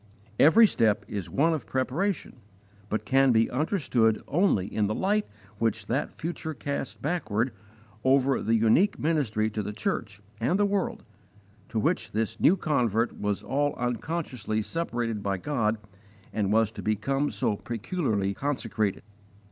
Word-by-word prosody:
Every 220 +10 +8
step 110 - +2
is 100 -6 -5
one 160 - +2
of 155 - -4
preparation, 145 +7 -1 0.5
but 110 0 -2
can 135 +1 +4
be 115 -1 +3
understood 125 - +1
only 155 - +2
in 105 +1 0
the 105 - -1
light 205 +2 +1 0.3
which 110 -2 0
that 130 +6 -1
future 160 -1 -5
casts 140 -1 -4
backward 130 -7 -1 0.5
over 135 0 +3
the 115 +2 +2
unique 115 - +3
ministry 140 -9 +1
to 105 - -2
the 105 +1 -5
church 105 - -3 0.2
and 145 +11 +1
the 205 - +4
world, 200 -2 -1 0.7
to 115 - -4
which 105 - 0
this 110 +1 -1
new 185 - +5
convert 120 - 0
was 105 -1 -1
all 145 +1 0
unconsciously 125 - -2
separated 120 -8 -2
by 100 -1 -1
God 115 -1 0 0.6
and 105 -2 0
was 110 0 +3
to 110 -2 -8
become 135 +8 0
so 105 0 0
peculiarly 115 - -2
consecrated. 115 -6 -2
120 Hz, 145 wpm, -27 LUFS, 110-150 Hz, 0.7 s, Every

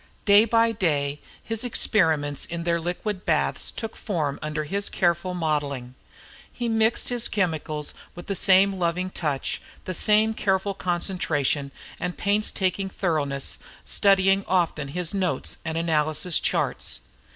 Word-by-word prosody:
Day 205 +1 +7
by 230 0 +3
day 150 -8 0 0.2
his 225 0 -2
experiments 160 - +2
in 170 0 -4
their 170 0 +1
liquid 185 +3 -3
baths - - 0
took 225 -1 -6
form 155 -9 -2
under 150 0 -2
his 200 +7 -2
careful 175 +1 0
modeling. 145 -6 -2 0.6
He 240 - -3
mixed 225 0 +2
his 245 -2 0
chemicals 155 -6 -1 0.2
with 175 - -9
the 200 - -2
same 190 +1 +4
loving 180 +2 0
touch, 150 -7 -2 0.2
the 185 - -3
same 215 +4 +4
careful 195 -1 0
concentration 170 -6 -1 0.3
and 180 0 -3
painstaking 200 -2 0
thoroughness, 150 -8 -1 0.3
studying 195 0 +3
often 170 -5 +1
his 175 +4 -3
notes 190 -3 -1
and 160 -1 -3
analysis 160 +1 +1
charts. - - -1
180 Hz, 130 wpm, -25 LUFS, 155-200 Hz, 0.6 s, Day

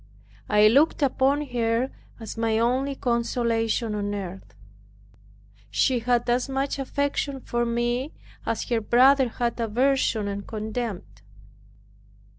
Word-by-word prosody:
I 210 0 +6
looked 285 +6 +3
upon 280 +2 +2
her 235 +1 0 0.3
as 225 -2 -7
my 225 -1 0
only 260 +4 +1
consolation 235 -2 0
on 205 0 -2
earth. 185 - -7 1.1
She 245 - +2
had 240 +1 +1
as 245 +3 +1
much 270 +1 -2
affection 280 0 -2
for 240 -1 -2
me, 240 +4 -1 0.3
as 230 -1 -2
her 235 -2 +1
brother 255 +4 +4
had 240 +1 -2
aversion 235 -1 +1
and 200 0 -5
contempt. 215 - -5
235 Hz, 115 wpm, -25 LUFS, 220-260 Hz, 1.1 s, I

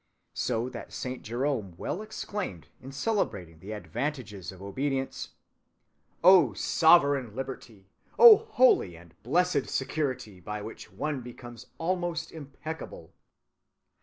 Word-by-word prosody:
So 120 -1 -1
that - - -9
Saint 130 0 -5
Jerome 120 -5 -2
well 185 - -3
exclaimed, 205 - -5
in 135 - -9
celebrating 100 - -2
the 100 +5 -7
advantages 105 - -4
of 95 - -13
obedience, 135 +7 -3 0.9
'Oh, 175 - +7
sovereign 140 - +4
liberty! 125 -6 -7 0.3
Oh, 460 -3 +11
holy 255 - +3
and 85 -1 -16
blessed 175 +2 +1
security 130 -8 -2
by 105 +4 -6
which 110 - -9
one 150 -4 -3
becomes 120 0 -11
almost 170 -1 -2
impeccable! 145 - -8
130 Hz, 110 wpm, -28 LUFS, 105-160 Hz, 0.9 s, Oh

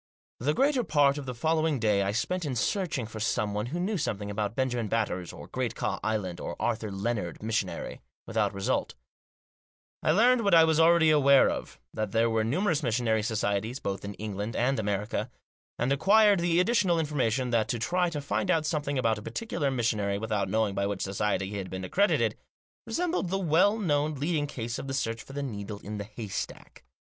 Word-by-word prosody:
The 150 +5 0
greater 275 -2 +2
part 145 -5 +3
of 140 - -8
the 125 - -4
following 160 +2 +1
day 105 -4 +2
I 100 0 0
spent 180 - -1
in 140 -5 -2
searching 160 - -1
for 110 0 -8
someone 105 0 -1
who 165 +8 -3
knew 195 +2 -1
something 105 -7 -3
about 105 +1 -2
Benjamin 125 -4 -1
Batters, 100 -5 -1
or - - -10
Great - - -3
Ka - - -2
Island, 100 -5 -2
or - - -6
Arthur 115 -2 -1
Lennard, 100 -2 -3
missionary 110 0 -3
— - - -75
without 110 -3 0
result 100 -1 -1 1.1
I - - 0
learned 235 +8 +4
what 200 -4 +4
I 165 - +8
was 160 -1 +3
already 165 -1 +6
aware 140 -2 +5
of, - - -6
that 110 -2 -3
there 115 +1 +3
were 110 -1 +1
numerous 160 - +1
missionary 115 -3 +1
societies, 110 +2 -1
both 100 -5 -4
in 100 0 -6
England 105 +1 -4
and 125 +1 +1
America; 105 +2 -2 0.5
and 125 +3 +1
acquired 205 +6 +5
the 170 0 +2
additional 185 -3 +3
information 130 -5 0
that 115 -2 +2
to 120 - -1
try 175 +10 +1
to 150 -3 -4
find 110 -6 -2
out 160 -1 +2
something 150 -3 -1
about 115 -4 +1
a - - -10
particular 150 - -2
missionary 110 -6 0
without 105 -1 -1
knowing 110 -2 +1
by 100 0 0
which 100 -2 -3
society 100 0 -1
he 105 - -4
had 95 -2 -5
been 95 0 -5
accredited, 200 - +2 0.5
resembled 345 - -1
the 195 - 0
well 190 +4 +3
known 150 -6 0
leading 145 +1 -1
case 120 -4 -4
of - - -6
the 135 - -2
search 115 -4 -2
for 135 - -12
the 145 0 -3
needle 105 -5 -5
in 105 +1 -5
the 100 - -4
haystack. 105 -2 -7
120 Hz, 195 wpm, -28 LUFS, 105-155 Hz, 1.1 s, I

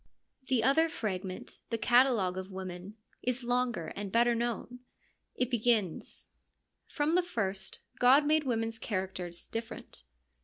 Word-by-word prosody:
The 250 -4 +2
other 320 +6 +4
fragment, 190 - -4
the 230 - 0
catalogue 240 -6 +4
of 190 0 -5
women, 185 +1 -7 0.3
is 250 0 -1
longer 245 -7 0
and 200 -1 -4
better 235 +2 +4
known. 240 +1 -2 0.6
It 250 0 0
begins: 225 -7 0 0.6
From 295 +1 0
the 360 - +5
first 200 - -3 0.2
God 265 +4 +6
made 310 +1 +3
women's 225 -3 -1
characters 185 -5 -3
different. 225 0 -6
230 Hz, 125 wpm, -31 LUFS, 190-250 Hz, 0.6 s, God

